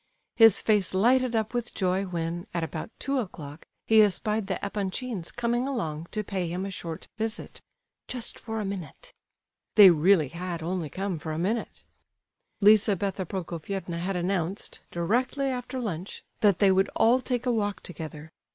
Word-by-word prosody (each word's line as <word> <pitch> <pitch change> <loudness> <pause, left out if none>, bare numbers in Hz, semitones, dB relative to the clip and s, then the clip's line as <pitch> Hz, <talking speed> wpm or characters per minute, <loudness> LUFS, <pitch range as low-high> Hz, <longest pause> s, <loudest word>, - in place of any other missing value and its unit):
His 225 -3 +6
face 205 -4 +2
lighted 245 +4 +3
up 220 +1 0
with 240 0 -3
joy 190 0 +1
when, 175 -1 -3
at 170 - 0
about 160 +2 -5
two 275 -1 -1
o'clock, 155 - -7 0.2
he 220 -1 +6
espied 210 +1 +1
the 190 -3 -1
Epanchins 200 -1 -3
coming 240 +2 0
along 165 - -3
to 215 - -3
pay 190 -3 -2
him 180 +3 -3
a 195 - -4
short 165 -3 -6
visit, 225 +1 -4 0.5
"just 250 -3 -6
for 220 -1 -4
a 210 - -2
minute." 195 -5 -7 0.6
They 200 -4 +10
really 165 -2 +4
had 170 +1 -5
only 175 -2 -2
come 190 -1 -3
for 155 +1 -5
a 155 - -3
minute. 210 +7 -2 0.8
Lizabetha 200 -3 +4
Prokofievna 175 0 -4
had 185 +3 -2
announced, 180 +1 -2
directly 245 +11 0
after 255 -1 -3
lunch, 190 -6 -5 0.2
that 200 -4 +4
they 200 -2 +5
would 190 +1 +3
all 245 +3 +4
take 250 -1 -2
a 250 - +2
walk 205 -4 -1
together. 155 -2 -8
195 Hz, 160 wpm, -27 LUFS, 175-225 Hz, 0.8 s, They